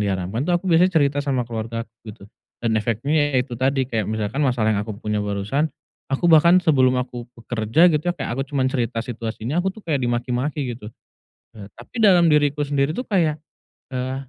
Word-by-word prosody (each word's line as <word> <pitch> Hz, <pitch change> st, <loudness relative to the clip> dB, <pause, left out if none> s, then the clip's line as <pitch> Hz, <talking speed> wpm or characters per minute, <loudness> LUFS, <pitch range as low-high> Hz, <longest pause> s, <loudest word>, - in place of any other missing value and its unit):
diharamkan 100 Hz, -, -2 dB
tuh 175 Hz, -, +3 dB
aku 175 Hz, -, -7 dB
biasanya 180 Hz, 0 st, +4 dB
cerita 145 Hz, -1 st, +2 dB
sama 135 Hz, -3 st, -1 dB
keluargaku, 115 Hz, 0 st, -5 dB, 0.2 s
gitu. 100 Hz, -1 st, -11 dB, 0.3 s
Dan 115 Hz, -1 st, -2 dB
efeknya 130 Hz, +7 st, 0 dB
ya 125 Hz, -, +2 dB
itu 125 Hz, -, -14 dB
tadi, 130 Hz, +2 st, 0 dB
kayak 110 Hz, -5 st, -2 dB
misalkan 110 Hz, +5 st, -2 dB
masalah 120 Hz, -6 st, +2 dB
yang 100 Hz, -, 0 dB
aku 105 Hz, -1 st, -6 dB
punya 105 Hz, 0 st, -2 dB
barusan, 105 Hz, +9 st, -1 dB, 0.4 s
aku 135 Hz, +5 st, -2 dB
bahkan 170 Hz, +1 st, +6 dB
sebelum 130 Hz, -7 st, +3 dB
aku 125 Hz, -1 st, -4 dB
bekerja 115 Hz, +9 st, +2 dB
gitu 150 Hz, -, +1 dB
ya, 175 Hz, -, 0 dB
kayak -, -, -4 dB
aku 135 Hz, +3 st, -3 dB
cuma 135 Hz, -2 st, 0 dB
cerita 120 Hz, -3 st, -1 dB
situasinya, 115 Hz, +5 st, -3 dB
aku 190 Hz, -, -1 dB
tuh 220 Hz, -, -13 dB
kayak 150 Hz, -5 st, 0 dB
dimaki-maki 125 Hz, +3 st, -2 dB
gitu. 115 Hz, -3 st, -9 dB, 0.7 s
Eee, 105 Hz, -2 st, -11 dB
tapi 220 Hz, -, -5 dB
dalam 180 Hz, -4 st, +6 dB
diriku 145 Hz, -1 st, +2 dB
sendiri 140 Hz, 0 st, 0 dB
tuh 250 Hz, +11 st, -4 dB
kayak, 165 Hz, -7 st, +1 dB, 0.5 s
eee, 130 Hz, 0 st, -3 dB
130 Hz, 190 wpm, -22 LUFS, 115-150 Hz, 0.7 s, bahkan